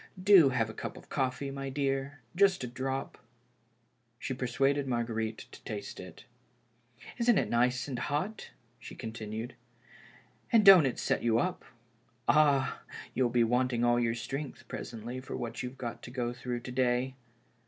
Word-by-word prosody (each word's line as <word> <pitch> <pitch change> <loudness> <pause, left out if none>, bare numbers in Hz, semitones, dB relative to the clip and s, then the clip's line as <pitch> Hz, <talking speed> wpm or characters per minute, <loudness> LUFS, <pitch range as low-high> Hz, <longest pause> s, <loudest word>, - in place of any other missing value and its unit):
Do 185 -6 +7
have 120 -4 +1
a 110 - -8
cup - - -6
of - - -14
coffee, 135 0 -1
my 135 0 -5
dear 135 0 -2
— 120 - -35
just 195 -4 +4
a - - -2
drop." 135 +2 -4 1.0
She 130 - -4
persuaded 135 +3 0
Marguerite 115 -2 -2
to - - -13
taste 105 -2 -6
it. 90 +3 -11 0.4
" 120 +2 -18
Isn't 235 -2 +4
it - - 0
nice 125 +3 +2
and 130 -3 -4
hot," 150 - -3 0.3
she - - -10
continued; 110 +1 -6 0.5
" - - -26
and 225 -3 +5
don't 185 -7 +9
it 125 - -3
set - - 0
j^ou 115 -1 +2
up. 180 0 -2 0.6
Ah! 145 -3 +3 0.3
you'll 125 -2 +2
be 120 0 +3
wanting 125 +1 +1
all 120 0 +4
your 115 -1 +1
strength 135 +3 -6
presently 120 +2 -6
for 130 - -6
what 120 -1 -4
you've 125 +1 -6
got 120 -3 -5
to - - -9
go 120 -1 -2
through 120 0 -4
to 125 - -7
day. 125 +1 +1
125 Hz, 170 wpm, -31 LUFS, 120-135 Hz, 1.0 s, don't